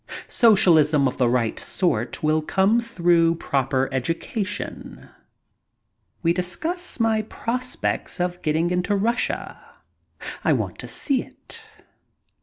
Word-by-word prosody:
Socialism 160 Hz, -, +4 dB
of 125 Hz, -, -5 dB
the 125 Hz, -2 st, +3 dB
right 120 Hz, -2 st, 0 dB
sort 120 Hz, -, -1 dB
will 155 Hz, +1 st, +2 dB
come 195 Hz, +8 st, +2 dB
through 170 Hz, -7 st, +2 dB
proper 135 Hz, -4 st, 0 dB
education. 165 Hz, -, -4 dB, 1.1 s
We 170 Hz, 0 st, +3 dB
discuss 310 Hz, -, -2 dB
my 225 Hz, -1 st, +2 dB
prospects 240 Hz, 0 st, -3 dB
of 180 Hz, 0 st, -2 dB
getting 160 Hz, +3 st, 0 dB
into 180 Hz, +3 st, 0 dB
Russia. 230 Hz, +4 st, -1 dB, 0.8 s
I -, -, +3 dB
want -, -, -3 dB
to -, -, -7 dB
see 270 Hz, -4 st, 0 dB
it. 460 Hz, -, -12 dB
175 Hz, 110 wpm, -23 LUFS, 155-220 Hz, 1.1 s, Socialism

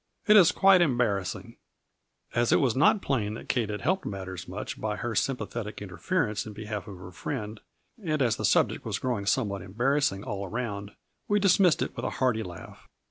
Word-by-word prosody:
It 210 Hz, -, +6 dB
is 180 Hz, -5 st, +8 dB
quite 195 Hz, -2 st, +5 dB
embarrassing.'' 120 Hz, -, 0 dB, 0.8 s
As 120 Hz, 0 st, +2 dB
it -, -, +5 dB
was 125 Hz, -5 st, +1 dB
not 155 Hz, +9 st, +4 dB
plain 110 Hz, -6 st, -1 dB
that -, -, -10 dB
Kate 115 Hz, -5 st, 0 dB
had 105 Hz, -1 st, -4 dB
helped 185 Hz, -, 0 dB
matters 95 Hz, -2 st, -6 dB
much 95 Hz, +4 st, -6 dB
by 105 Hz, -1 st, -1 dB
her 120 Hz, +1 st, -3 dB
sympathetic 115 Hz, -2 st, -2 dB
interference 105 Hz, -, -2 dB
in 105 Hz, -, -7 dB
behalf 105 Hz, 0 st, -6 dB
of 100 Hz, -3 st, -8 dB
her 90 Hz, 0 st, -10 dB
friend, 105 Hz, +1 st, -5 dB, 0.4 s
and 155 Hz, -3 st, 0 dB
as 120 Hz, -5 st, +2 dB
the -, -, -5 dB
subject -, -, +2 dB
was -, -, -2 dB
growing 115 Hz, -6 st, -2 dB
somewhat 105 Hz, -4 st, 0 dB
embarrassing 115 Hz, +1 st, 0 dB
all 100 Hz, -1 st, -4 dB
around, 100 Hz, -1 st, -4 dB, 0.3 s
we 205 Hz, 0 st, +2 dB
dismissed 190 Hz, -3 st, +4 dB
it -, -, -6 dB
with -, -, -4 dB
a -, -, 0 dB
hearty 125 Hz, -4 st, +1 dB
laugh. 90 Hz, -5 st, -10 dB
110 Hz, 190 wpm, -27 LUFS, 100-135 Hz, 0.8 s, is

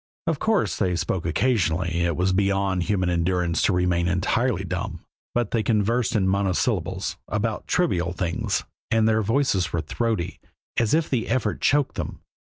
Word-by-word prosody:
Of 165 Hz, -4 st, 0 dB
course 220 Hz, -3 st, +1 dB
they 90 Hz, -3 st, +1 dB
spoke 85 Hz, 0 st, -1 dB
occasionally 85 Hz, -, +1 dB
it 85 Hz, -2 st, +1 dB
was 95 Hz, +1 st, +2 dB
beyond 95 Hz, -1 st, +1 dB
human 95 Hz, -1 st, 0 dB
endurance 85 Hz, -1 st, +1 dB
to -, -, +3 dB
remain 90 Hz, -1 st, +1 dB
entirely 95 Hz, +4 st, +1 dB
dumb 90 Hz, -1 st, -4 dB, 0.3 s
but 120 Hz, -3 st, 0 dB
they 115 Hz, -, +2 dB
conversed 115 Hz, +2 st, +1 dB
in 95 Hz, -3 st, +2 dB
monosyllables, 95 Hz, -1 st, 0 dB
about 105 Hz, +1 st, -2 dB
trivial 90 Hz, -, +1 dB
things, 90 Hz, -2 st, -1 dB, 0.3 s
and 110 Hz, -1 st, +3 dB
their 110 Hz, 0 st, +3 dB
voices 110 Hz, -5 st, +1 dB
were 85 Hz, -, 0 dB
throaty, 90 Hz, +2 st, -2 dB, 0.4 s
as 115 Hz, +3 st, +3 dB
if 160 Hz, 0 st, +1 dB
the 120 Hz, -4 st, -1 dB
effort 115 Hz, -3 st, -1 dB
choked 145 Hz, -1 st, +2 dB
them. -, -, -5 dB
100 Hz, 160 wpm, -24 LUFS, 90-115 Hz, 0.4 s, to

